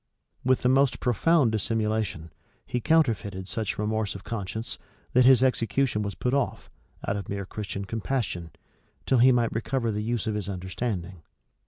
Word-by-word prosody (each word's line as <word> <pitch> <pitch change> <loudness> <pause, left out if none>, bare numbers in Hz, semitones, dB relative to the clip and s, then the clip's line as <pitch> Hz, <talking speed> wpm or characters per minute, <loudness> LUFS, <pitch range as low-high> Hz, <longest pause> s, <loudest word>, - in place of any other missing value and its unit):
With 130 0 +2
the - - +4
most 135 0 +3
profound 130 +2 +3
dissimulation, 110 -7 -1 0.3
he 125 - -2
counterfeited 105 - +1
such 110 0 -2
remorse 105 -1 -1
of 95 - -8
conscience, 110 0 -4 0.3
that 125 0 +5
his 130 -1 +7
execution 125 -2 +1
was 100 -2 -3
put 125 - -1
off, 140 -2 -1 0.4
out 100 - 0
of 100 - -6
mere 100 -1 -3
Christian 100 0 -5
compassion, 100 -6 -2 0.6
till 130 - +3
he 130 +2 +7
might 120 -2 +2
recover 115 +1 -1
the 105 0 -2
use 115 +1 -1
of 110 - -1
his 105 -2 -3
understanding. 95 -1 -4
110 Hz, 160 wpm, -27 LUFS, 100-125 Hz, 0.6 s, his